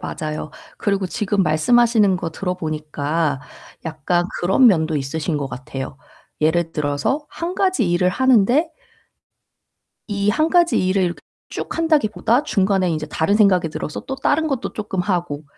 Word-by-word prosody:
맞아요. 155 0 -5 0.3
그리고 200 -3 0
지금 200 +2 0
말씀하시는 210 +5 +3
거 170 -2 -4
들어 180 +3 -3
보니까 155 -2 -2 0.4
약간 160 +2 -1 0.2
그런 195 +9 +4
면도 160 -7 +3
있으신 150 +3 -2
것 145 -1 -2
같아요. 130 +1 -7 0.4
예를 165 +2 +1
들어서 150 - -1
1 340 +2 -5
가지 370 - +1
일을 180 +1 +2
하는데 260 - +3 1.4
이 200 -1 -1
1 310 +9 +1
가지 345 0 +3
일을 185 -2 +1 0.3
쭉 - - -5
한다기보다 285 -6 +2
중간에 195 -6 +1
인제 155 -1 -2
다른 160 +6 0
생각이 185 -6 +4
들어서 150 -1 -5
또 265 - -5
다른 315 +4 +1
것도 270 -5 -3
쪼끔 205 -3 -3
하고 175 -6 -2
185 Hz, 295 characters per minute, -20 LUFS, 155-230 Hz, 1.4 s, 그런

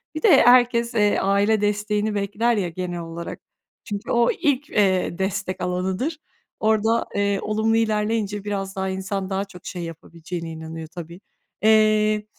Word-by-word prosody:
Bir 310 - -3
de - - +7
herkes, 240 -1 +4
eee, 210 -2 +3
aile 200 +2 +2
desteğini 210 +1 0
bekler 205 +4 0
ya 185 -4 -1
genel 175 0 -4
olarak. 170 0 -7 0.4
Çünkü 205 +2 -5
o 235 0 +3
ilk, 290 -3 0
eee, 190 -4 +1
destek 190 0 -2
alanıdır. 185 - -2 0.4
Orada, 220 +1 +2
eee, 200 -1 +1
olumlu 220 +1 +1
ilerleyince 210 -2 0
biraz 195 -1 -4
daha 190 0 -2
insan 190 0 -3
daha 195 0 -1
çok 180 -2 -15
şey 175 -2 -5
yapabileceğine 165 +1 -7
inanıyor 160 0 -7
tabii. 170 +1 -9 0.4
Eee, 215 -1 +4
205 Hz, 145 wpm, -23 LUFS, 185-220 Hz, 0.4 s, de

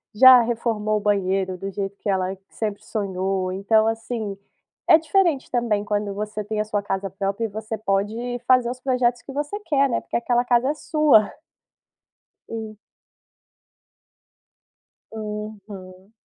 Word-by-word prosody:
já 255 +1 +9
reformou 225 -2 -1
o - - -3
banheiro 190 -2 0
do 195 +2 -5
jeito 195 +1 -5
que 205 - -4
ela 190 0 0
sempre 210 -2 -4
sonhou. 190 -2 -2
Então, 215 +3 +2
assim, 225 -2 -3 0.5
é 320 - +8
diferente 325 -3 +1
também 230 -4 0
quando 205 -1 -2
você 210 +1 -4
tem 215 0 -1
a - - -2
sua 210 -1 -1
casa 195 -1 -3
própria 195 +3 -3
e - - -1
você 220 +2 -5
pode 220 +5 -2
fazer 250 -2 +4
os 255 - -8
projetos 250 -2 +1
que 270 - -10
você 295 +8 -3
quer, 280 -7 +2
né, 235 - 0
porque - - -7
aquela 240 +1 +1
casa 245 +2 +2
é - - +1
sua. 300 -9 +3 1.2
Hum. 220 -2 -6 2.3
Aham. 210 -3 -8
215 Hz, 145 wpm, -23 LUFS, 200-245 Hz, 2.3 s, já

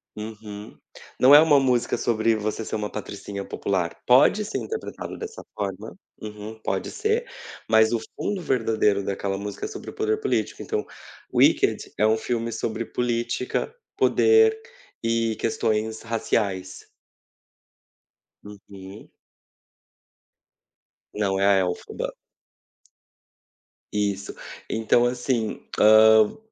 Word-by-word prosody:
Uhum, 105 -1 -9 0.4
não 135 +3 +8
é - - +11
uma 155 -2 +5
música 125 -3 +1
sobre 115 -1 +1
você 110 +1 -3
ser - - -4
uma 105 -1 -3
patricinha 100 -1 -6
popular, 90 -4 -2
pode 135 +12 +5
ser 215 - -4
interpretado 445 0 -6
dessa 450 0 -8
forma, 100 +1 -5 0.2
uhum, 105 +1 -8
pode - - -2
ser, 435 +3 -1 0.4
mas 110 +1 +5
o 115 - +1 0.2
fundo 200 -3 -3
verdadeiro 110 - +1
daquela 100 0 -3
música 100 +1 -5
é - - -3
sobre 405 -2 -8
o - - -17
poder 430 0 -1
político 420 - -2
então, 435 -1 -2 0.5
Wicked 400 - +2
é 105 - +3
um 110 +1 +3
filme 115 0 -2
sobre 115 +1 -3
política, 120 - -2 0.2
poder 445 0 +4 0.4
e 115 -1 0
questões 110 0 -1
raciais. 100 -4 -2 1.6
Uhum. 100 -1 -12 2.0
Não, 100 -2 0
é 100 - +2
a 100 -1 +5
elfoba. 90 -1 -3 1.8
Isso. 100 -1 -2 0.3
Então 115 +2 +2
assim, 120 -2 -1 0.2
ham 110 0 +6
110 Hz, 115 wpm, -24 LUFS, 105-125 Hz, 2.0 s, é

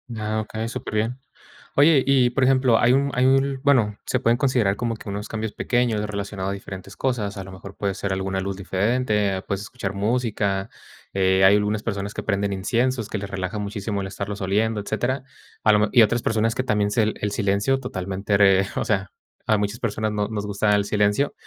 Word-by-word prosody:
Ah, 110 0 -2
okey, 110 +1 -4
superbién. 115 +2 -2 0.6
Oye, 145 -1 +5
y 130 -2 +4
por 130 +2 0
ejemplo, 130 -3 +4
hay 120 +2 +4
un 140 +1 +2
hay 125 0 +3
un 135 0 +2
bueno, 120 -8 +3
se 130 - 0
pueden 120 -1 +2
considerar 125 -7 +2
como 115 0 -2
que 110 - -9
unos 100 +1 -4
cambios 110 -1 -4
pequeños 120 -2 0
relacionado 100 -2 -4
a - - -1
diferentes 100 0 -9
cosas. 110 -6 -2
A 95 - -5
lo 95 - -10
mejor 95 +1 -11
puede 100 -2 -2
ser 100 0 -2
alguna 95 0 -2
luz 95 0 -3
diferente, 105 +1 0
eh, - - -5
puedes 100 0 -3
escuchar 105 -3 -5
música, 105 -2 -1 0.4
eh, 95 0 +3
hay 95 +2 +7
algunas 105 +1 0
personas 100 -2 -3
que - - -4
prenden 100 -1 -1
inciensos, 115 +4 0
que - - -3
les 100 0 -6
relaja 95 +2 -3
muchísimo 100 0 -3
el 95 - -4
estarlos 100 +1 -5
oliendo, 105 +3 +1
etcétera. 130 +6 -2 0.4
A 110 - +5
lo 105 - +4
me 105 - +3
y 120 -3 +7
otras 120 +3 +1
personas 110 0 +1
que 130 - -1
también 105 -4 +1
sel 110 -1 +1
el 105 - -2
silencio 100 +6 +1
totalmente 100 -4 -2
re 95 -1 +5
o - - -1
sea, 100 -4 -1 0.4
a 110 - +4
muchas 105 +2 -2
personas 110 -1 -1
no 105 -1 -1
nos 105 -2 -4
gusta 105 +1 +1
el 100 0 +1
silencio, 105 +7 +1
105 Hz, 205 wpm, -23 LUFS, 100-120 Hz, 0.6 s, hay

